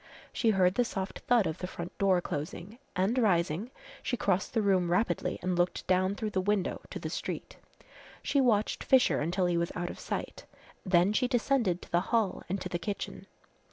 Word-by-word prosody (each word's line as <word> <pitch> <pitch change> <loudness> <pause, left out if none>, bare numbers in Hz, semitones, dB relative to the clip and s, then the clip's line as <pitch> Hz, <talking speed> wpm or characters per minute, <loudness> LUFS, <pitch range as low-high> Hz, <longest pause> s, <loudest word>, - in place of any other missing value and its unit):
She 230 - +2
heard 185 -3 +4
the 245 - +2
soft 195 -5 -4
thud 240 -4 +4
of 160 - -3
the 180 - -4
front 170 -1 -7
door 190 -3 +3
closing, 175 - -5 0.2
and 200 +7 +1
rising 180 -1 +1 0.3
she 245 - -2
crossed 195 +1 0
the 225 - +3
room 185 -3 +2
rapidly 180 +7 0
and 185 0 0
looked 175 +1 0
down 185 +1 +2
through 215 0 -3
the 190 - 0
window 200 -1 0
to - - -5
the - - -5
street. - - -5 0.7
She 280 - +2
watched 220 -5 +2
Fisher 260 -1 +4
until 180 +4 0
he 175 -1 +1
was 170 0 0
out 175 0 -2
of - - -11
sight; - - -5 0.4
then 185 +1 +3
she 250 +3 +2
descended 240 -7 +1
to - - -15
the 175 - +3
hall 225 -5 +1
and 195 +2 -1
to - - -3
the 175 - -2
kitchen. 205 +2 -5
190 Hz, 195 wpm, -30 LUFS, 175-220 Hz, 0.7 s, heard